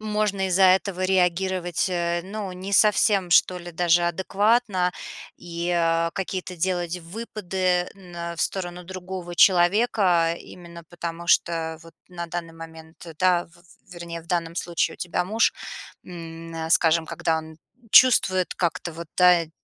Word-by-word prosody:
можно 210 -3 -1
из-за 190 +1 +4
этого 185 0 +2
реагировать, 180 -1 0
э, 175 -1 -1
ну, 200 0 -6
не 190 +2 -7
совсем, 205 -3 +3
что 180 +1 +4
ли, 175 0 -9
даже 175 +1 +2
адекватно. 190 +1 +1 0.4
И, 170 0 -5
а, 165 -1 +1
какие-то 185 -2 -5
делать 175 0 -2
выпады 185 -1 -2
на 175 -3 -8
в 165 - -6
сторону 180 -2 -4
другого 185 -1 -7
человека 180 -2 +3
именно 170 -1 -12
потому, 170 0 -6
что 160 -1 +1
вот 165 0 -16
на 170 -1 -6
данный 170 -1 -6
момент, 165 0 -12
да, 180 -1 +3
в 170 +1 -23 0.3
вернее, 170 -1 -7
в - - -22
данном 170 -1 -2
случае 170 -1 -1
у - - -16
тебя 180 0 -2
муж, 220 +4 +2 0.5
м, 165 -1 -9
на 160 0 -5
скажем, 165 -1 +3
когда 160 -1 -1
он 160 0 -10 0.4
чувствует 185 -8 +5
как-то 170 -1 -2
вот, 165 +1 -8
да, 180 -2 +5
и 155 - -20
175 Hz, 145 wpm, -24 LUFS, 170-185 Hz, 0.5 s, чувствует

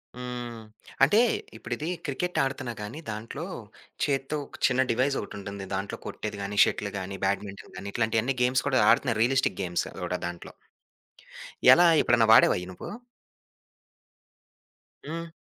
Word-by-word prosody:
హ్మ్. 120 -2 -6 0.4
అంటే 205 +11 +6 0.4
ఇప్పుడిదీ 120 +8 -5 0.2
క్రికెట్ 175 +5 -2
ఆడుతన్నా 135 -3 -3
గాని 115 +10 -6
దాంట్లో 115 +9 -5 0.6
చేత్తో 135 +1 -1
ఒక - - -14
చిన్న 130 0 +2
డివైస్ 130 +4 +1
ఒకటుంటుంది. 100 -1 -7
దాంట్లో 95 +1 -4
కొట్టేది 105 -1 -5
గాని, 100 +1 -4
షటిల్ 100 -1 -1
గాని, 95 +1 -6
బ్యాడ్మింటన్ 100 0 -3
గాని 100 +2 -6
ఇట్లాంటియన్ని 115 +3 +1
గేమ్స్ 130 +2 +2
కూడా 130 - +3
ఆడుతున్నారు 115 -5 +3
రియలిస్టిక్ 135 -2 +1
గేమ్స్ 90 -2 -1
అది - - -10
గూడా - - -2
దాంట్లో. 85 0 -8 1.2
ఎలా? 175 - +5 0.2
ఎప్పుడైనా 120 -2 +3
వాడావా - - +6
అయి 90 - -6
నువ్వు? - - -8 2.2
హ్మ్. 165 +3 -5
120 Hz, 130 wpm, -27 LUFS, 100-135 Hz, 2.2 s, అంటే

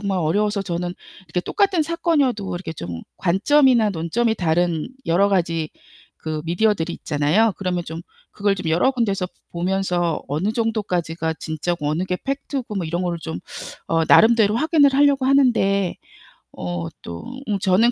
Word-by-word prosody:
정말 200 -2 -1
어려워서 200 +5 +1
저는 175 -1 -3 0.3
이렇게 175 +2 -2
똑같은 390 - +1
사건이어도 295 - 0
이렇게 175 -2 -5
좀 85 - -7 0.2
관점이나 230 +5 +4
논점이 200 +7 0
다른 170 -3 0 0.2
여러 185 +5 +3
가지 165 -4 0 0.5
그 155 -1 -4
미디어들이 175 -1 +1
있잖아요. 160 +9 +1
그러면 180 -2 -2
좀 160 0 -6 0.3
그걸 205 -1 0
좀 185 -4 -3
여러 175 +11 +3
군데서 200 -7 0 0.2
보면서 175 -2 -1
어느 160 +9 -1
정도까지가 180 -8 -1
진짜고 155 0 -3
어느 160 +4 -1
게 185 -1 -2
팩트고 275 -4 -3
뭐 180 -4 -2
이런 170 +3 -2
거를 175 -1 -2
좀 85 - -5 0.5
어 165 0 +2
나름대로 220 0 +5
확인을 295 -1 +4
하려고 280 -1 +4
하는데 225 -9 +3 0.6
어 85 -1 -3 0.2
또 85 0 -7 0.2
응 205 -2 0
저는 195 +5 +3
190 Hz, 340 characters per minute, -22 LUFS, 165-225 Hz, 0.6 s, 나름대로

